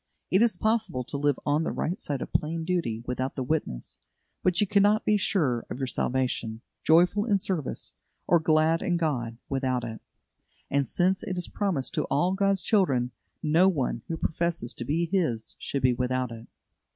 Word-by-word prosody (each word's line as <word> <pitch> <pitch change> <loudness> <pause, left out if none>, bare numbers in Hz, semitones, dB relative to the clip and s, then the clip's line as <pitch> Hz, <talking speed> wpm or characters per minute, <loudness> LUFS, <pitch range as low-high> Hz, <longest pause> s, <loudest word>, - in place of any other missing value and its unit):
It 190 - +4
is 230 -6 +3
possible 215 - 0
to 135 - -5
live 145 -1 +1
on 150 +2 +2
the - - -1
right 175 - -2
side 140 -3 -3
of - - -10
plain 160 +2 0
duty 160 -11 -1
without 130 +2 -2
the 130 - -2
witness, 125 - -3 0.4
but 180 -2 +2
you 210 - +4
cannot 205 +2 +3
be 210 - +4
sure 155 - +1
of - - -5
your 135 - -1
salvation, 125 -3 -1 0.2
joyful 180 +6 +4
in 205 -4 +3
service, 185 -7 -2 0.3
or 170 - +4
glad 160 +1 +3
in 175 -2 +1
God, 125 -9 -1
without 130 -2 -1
it; 110 -2 -6 0.7
and 140 -1 +2
since 185 +1 +2
it 185 - -4
is 180 - -2
promised 185 -10 -1
to - - 0
all 175 +6 +1
God's 195 -2 +1
children, 140 - +2 0.3
no 165 +5 +5
one 135 -9 -1
who 165 - -3
professes 170 -6 -1
to 120 - -6
be 160 +6 +1
His 160 - -1
should 140 -2 -3
be 130 -1 +5
without 125 0 -1
it. 115 0 -9
155 Hz, 185 wpm, -27 LUFS, 130-185 Hz, 0.7 s, no